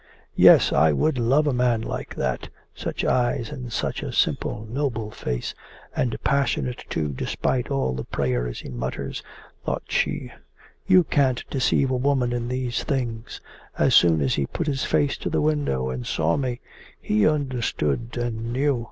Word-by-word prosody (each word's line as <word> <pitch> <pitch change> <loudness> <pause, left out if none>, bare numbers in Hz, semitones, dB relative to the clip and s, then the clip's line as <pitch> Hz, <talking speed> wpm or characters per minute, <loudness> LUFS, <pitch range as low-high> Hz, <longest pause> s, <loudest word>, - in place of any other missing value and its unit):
'Yes, - - +7
I 80 +2 +5
could 155 - +1
love 135 +6 +3
a 145 - +1
man 125 -2 +2
like - - -5
that - - -2 0.2
such - - -4
eyes 120 -2 +1
and 125 -2 -7
such - - -2
a - - -4
simple 110 - 0
noble 115 -4 -2
face, - - -4 0.4
and 120 -3 0
passionate 140 -3 0
too 75 -2 -1
despite 120 - -1
all 135 - 0
the 65 0 -4
prayers 60 -3 -2
he - - -9
mutters!' 65 0 -4 0.4
thought - - -2
she. - - -1 0.6
'You 185 -2 +6
can't 135 -6 +1
deceive 135 0 +2
a 130 - +1
woman 130 -2 +1
in 120 -1 -2
these 125 -1 -2
things. 120 -6 -3 0.4
As - - +3
soon 80 -3 +6
as 70 -2 +1
he 70 -2 0
put 170 - -3
his 140 -3 -1
face 145 -1 +1
to - - -3
the - - 0
window 145 - 0
and 65 -1 -4
saw 80 +1 +1
me, 125 -3 -2 0.4
he 105 0 +2
understood 120 - -1
and 115 -1 -3
knew. 135 +1 +1
120 Hz, 165 wpm, -24 LUFS, 85-135 Hz, 0.6 s, Yes